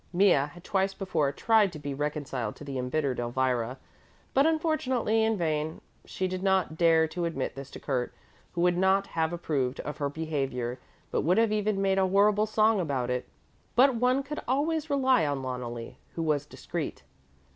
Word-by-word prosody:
Mea 190 +2 +5 0.2
had 175 +3 -14
twice 195 0 0
before 165 -8 0
tried 215 +5 +3
to 165 - -8
be 145 -1 -5
reconciled 140 -6 -3
to - - -11
the 140 -2 -4
embittered 130 +1 -1
Elvira, 125 0 0 0.6
but 275 +3 +4
unfortunately 260 -9 +1
in 220 -1 +1
vain. 155 -2 -1 0.3
She 185 - -2
did 185 0 -4
not 190 -4 +1
dare 160 -1 +4
to 170 +1 -2
admit 160 -6 -2
this 135 0 -8
to - - -9
Kurt, 125 -4 -2 0.4
who 170 - -1
would 175 0 +3
not 190 +1 +3
have 160 -2 -1
approved 145 -7 -1
of 150 - -6
her 145 -2 -1
behaviour 135 -5 -3 0.3
but - - +1
would 175 +5 +2
have 225 -1 +3
even 210 -2 0
made 195 0 +2
a 190 - +3
horrible 205 +2 +3
song 215 0 +3
about 135 -7 -1
it. 125 0 -3 0.5
But 265 +2 +6
one 250 +3 +2
could 300 +2 -5
always 305 +4 0
rely 265 -3 +3
on 145 -3 -1
Loneli, 120 -2 -5 0.2
who 165 - -2
was 150 -2 0
discreet. - - -5
170 Hz, 180 wpm, -28 LUFS, 140-210 Hz, 0.6 s, But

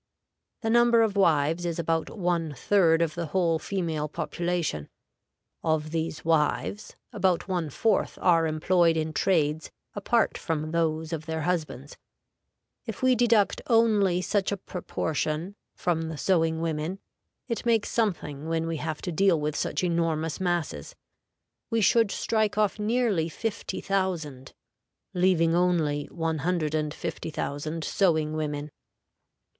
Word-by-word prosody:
The 225 - 0
number 235 -1 +5
of 215 -2 0
wives 165 -3 +2
is 170 -2 -2
about 165 -1 -1
one 170 -6 -1
third 170 0 +3
of 160 -2 -2
the 170 0 -4
whole 165 -1 +1
female 165 -6 -2
population; 170 - -2 0.7
of 155 -1 0
these 160 -1 -3
wives 165 +6 0 0.2
about 185 -3 +1
one 175 -5 -1
fourth 220 +10 0
are 165 -3 +4
employed 165 +1 +2
in 155 0 -2
trades 160 -5 +1 0.2
apart 225 +3 +1
from 155 -1 -2
those 160 -1 -1
of 160 0 -5
their 160 -1 -2
husbands. 155 -5 -3 0.9
If 225 +2 -6
we 255 0 +5
deduct 230 -4 +3
only 210 -6 +3
such 200 0 0
a 200 - -1
proportion 170 -1 -3 0.2
from 165 -2 -1
the 160 - -6
sewing 165 -1 +1
women, 165 +2 -2 0.5
it 230 -4 -3
makes 230 -3 +1
something 160 -9 -1
when 165 0 0
we 165 -1 -2
have 155 0 -4
to 180 - -2
deal 175 0 +3
with 150 0 -2
such - - -1
enormous 165 -3 0
masses; 175 -3 -2 0.7
we 230 -1 +1
should 225 +1 +4
strike 215 0 0
off 210 0 +1
nearly 210 -6 +1
50,000, 185 - -3 0.6
leaving 175 -2 +3
only 165 -5 +1
150,000 155 -1 -2
sewing 160 -6 +1
women. 150 -1 -3
165 Hz, 130 wpm, -27 LUFS, 155-195 Hz, 0.9 s, number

